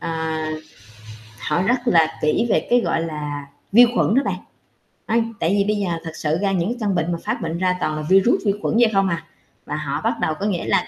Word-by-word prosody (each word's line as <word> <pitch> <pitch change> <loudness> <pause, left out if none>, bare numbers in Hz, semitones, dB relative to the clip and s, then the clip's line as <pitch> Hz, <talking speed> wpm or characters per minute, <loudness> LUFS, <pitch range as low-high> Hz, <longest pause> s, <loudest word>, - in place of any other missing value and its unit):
ờ, 170 - -4 1.3
họ 150 - 0
rất 245 +6 +2
là 165 -6 +3
kỹ 155 +9 +2
về - - +2
cái, 245 - +5
gọi 165 - 0
là, 150 -3 -5 0.3
vi 240 +4 +8
khuẩn 220 - +2
đó 270 - +4
bạn. - - -2 0.7
Ây, 230 +1 +2 0.2
tại 165 - +1
vì 200 +1 +3
bây - - -1
giờ 200 -3 -1
thật 165 - -6
sự 155 +1 -1
ra 200 -1 +1
những 180 0 0
cái 245 - -3
căn 205 -4 0
bệnh 170 0 0
mà 170 - -1
phát - - -2
bệnh 165 0 -3
ra 180 0 +1
toàn 155 -3 -1
là 155 - -3
vi-rút, 195 +5 +5
vi 200 - +3
khuẩn - - -1
vậy 235 -2 +5
không 195 -1 +3
à. 170 -2 -2 0.4
Và 150 - -4
họ 150 -1 -3
bắt 225 - +2
đầu 160 - +1
có 200 - -2
nghĩa 190 -5 -1
là - - +1
180 Hz, 245 wpm, -21 LUFS, 160-205 Hz, 1.3 s, vi